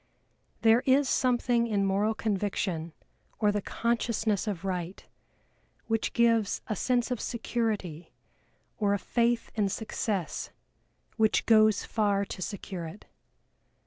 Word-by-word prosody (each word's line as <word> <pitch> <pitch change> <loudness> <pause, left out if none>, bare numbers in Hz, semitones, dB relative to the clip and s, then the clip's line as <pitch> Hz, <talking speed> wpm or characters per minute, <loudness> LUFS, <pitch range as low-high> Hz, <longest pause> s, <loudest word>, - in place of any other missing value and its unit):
There 225 +1 +6
is 270 +1 +4
something 240 -2 +2
in 205 -3 +1
moral 205 +3 +1
conviction 195 -6 -2 0.4
or 210 -2 +3
the 205 0 -1
consciousness 230 -2 -1
of 195 -3 -3
right 180 -1 -4 0.8
which 225 -1 -1
gives 230 -3 +2
a 215 - -2
sense 245 +3 0
of 245 - -2
security 215 -8 -3 0.7
or 205 -1 +2
a - - 0
faith 235 +4 0
in 205 -2 +1
success 200 -4 -3 0.7
which 220 -1 +2
goes 215 -2 +5
far 205 -2 +1
to 185 - -7
secure 185 -3 -5
it. 185 +6 -11
215 Hz, 120 wpm, -29 LUFS, 195-235 Hz, 0.8 s, There